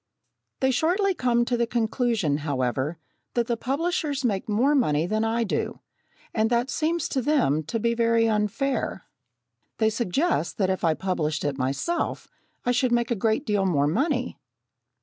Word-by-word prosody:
They 265 0 +3
shortly 365 - +2
come 240 -6 +1
to 245 - 0
the 235 0 +1
conclusion, 225 - 0
however, 140 +1 -1 0.4
that 240 -1 +2
the 235 - 0
publishers 285 +1 -1
make 205 -3 -1
more 245 +8 +3
money 160 - +2
than 215 +4 0
I 230 +1 +1
do, 205 - -2 0.5
and 220 0 +2
that 240 +2 +1
seems 325 +1 0
to 265 - 0
them 245 - +2
to 225 +9 -2
be 235 +2 +1
very 230 -1 +3
unfair. 220 - -1 0.7
They 220 0 +2
suggest 235 - 0
that 190 -2 +2
if 190 - -3
I 160 -2 +3
published 160 -5 -1
it 140 -1 -2
myself, 140 - -1 0.4
I 245 - +3
should 250 0 +1
make 240 0 +1
a - - +2
great 220 +7 0
deal 205 -3 +1
more 145 -6 +2
money! 255 - 0
230 Hz, 165 wpm, -25 LUFS, 185-255 Hz, 0.7 s, They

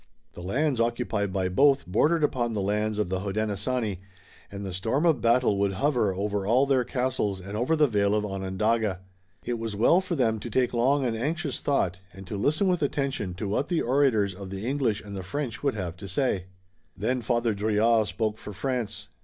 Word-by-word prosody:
The - - -9
lands 130 - 0
occupied 115 -4 -1
by 95 0 0
both 140 +9 +3
bordered 150 - +2
upon 120 -5 0
the 100 - 0
lands 105 +1 0
of 105 -4 0
the 95 0 -1
Hodenosaunee, 105 +1 -2 0.5
and 100 0 -6
the 95 - -5
storm 115 - 0
of 155 -8 +3
battle 115 -3 +3
would 100 -1 +1
hover 120 -4 +1
over 100 +1 -1
all 125 +5 +4
their 135 -2 +2
castles 125 -6 -1
and 100 +3 -7
over 125 +9 +1
the 155 -1 +4
vale 105 -5 +2
of 105 0 0
Onondaga. 95 +1 -1 0.4
It 120 -1 -2
was 115 -2 -4
well 165 - +4
for 180 -2 -3
them 115 -6 +1
to 110 - -6
take 125 +2 +1
long 130 +4 +2
and 115 -2 0
anxious 150 +4 -2
thought, 95 -11 0
and 95 +1 -10
to 100 - -5
listen 150 - +1
with 180 -2 +1
attention 135 -10 -1
to 100 +3 -4
what 120 +9 0
the 175 -3 +1
orators 120 -7 +2
of 95 +1 -8
the 95 +2 -5
English 125 -5 0
and 100 -1 -8
the 95 - -4
French 120 +5 -4
would 140 -4 0
have 90 -4 -4
to 100 - -8
say. 95 -2 0 0.5
Then 120 +5 0
Father 120 -1 +1
Drouillard 110 +2 +2
spoke 110 +4 -2
for 105 - -8
France. 120 +3 -3
110 Hz, 205 wpm, -27 LUFS, 100-130 Hz, 0.5 s, all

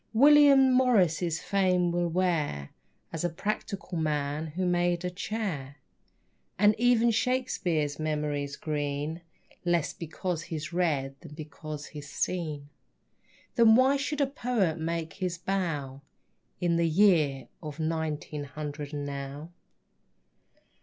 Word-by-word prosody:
William 275 +1 +7
Morris's 180 -10 +3
fame 180 -3 +2
will 175 0 0
wear 165 - -1 0.4
As 165 - -3
a 175 - +1
practical 200 0 -4
man 150 0 -1
who 180 +5 -3
made 175 0 +1
a 180 - -2
chair. 180 -9 -4 0.8
And 210 +2 +5
even 240 -1 +4
Shakespere's 190 - 0
memory's 150 -2 -2
green 150 +2 -3 0.4
Less 175 -3 +1
because 170 +1 -4
he's 160 -1 -6
read 145 -6 0
than 155 -4 -11
because 150 -1 -7
he's 145 -2 -9
seen. 150 -1 -3 0.8
Then 225 -2 +6
why 260 +3 +5
should 285 +1 -2
a - - +5
poet 240 - -1
make 165 0 -3
his 180 -3 -3
bow 165 -8 -2 0.6
In 170 -1 +1
the 170 0 +2
year 160 -7 +3
of 150 -1 -7
nineteen 155 -2 -2
hundred 145 +1 -6
and 145 -1 -3
now? 140 +3 -6
165 Hz, 120 wpm, -28 LUFS, 150-190 Hz, 0.8 s, William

